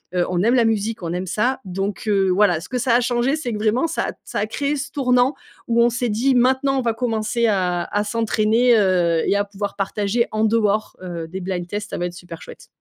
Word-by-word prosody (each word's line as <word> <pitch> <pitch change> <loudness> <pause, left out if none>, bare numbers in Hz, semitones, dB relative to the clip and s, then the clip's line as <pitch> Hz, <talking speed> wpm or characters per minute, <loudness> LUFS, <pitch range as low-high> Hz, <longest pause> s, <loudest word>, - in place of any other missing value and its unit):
heu, 175 -1 +2
on 180 -1 0
aime 235 +3 +3
la 240 - +4
musique, 220 -1 -1
on 165 - -3
aime 180 +1 -3
ça.», 245 +8 0
donc 195 +2 -4
heu, 195 -2 +2
voilà, 180 -3 +3
ce - - -11
que 255 - -2
ça 245 0 +1
a 245 - +4
changé 245 +3 +1
c'est 290 -6 -4
que - - -3
vraiment 225 +8 +1
ça 330 - -2
a - - -3
ça - - -4
a 205 - +1
créé 280 +6 -2
ce 290 +1 -5
tournant 250 -1 +2 0.3
où 235 0 +3
on 240 - +4
s'est 240 0 -2
dit: 245 +5 +1
«Maintenant 265 +2 +2
on - - 0
va 235 -2 0
commencer 230 0 -1
à 180 -4 0
à 205 - -1
s'entraîner, 225 +2 +2
heu, 175 -5 +2
et - - +2
à 200 - +2
pouvoir 200 0 -5
partager 205 +3 -1
en 215 0 0
dehors, 215 -1 +1
heu, 170 -3 -5
des 185 +4 -6
blind 180 -1 -4
tests, 205 +3 -5
ça - - -3
va 175 - -2
être 175 - -8
super 175 -2 -10
chouette.» - - -12
215 Hz, 250 wpm, -21 LUFS, 190-245 Hz, 0.3 s, la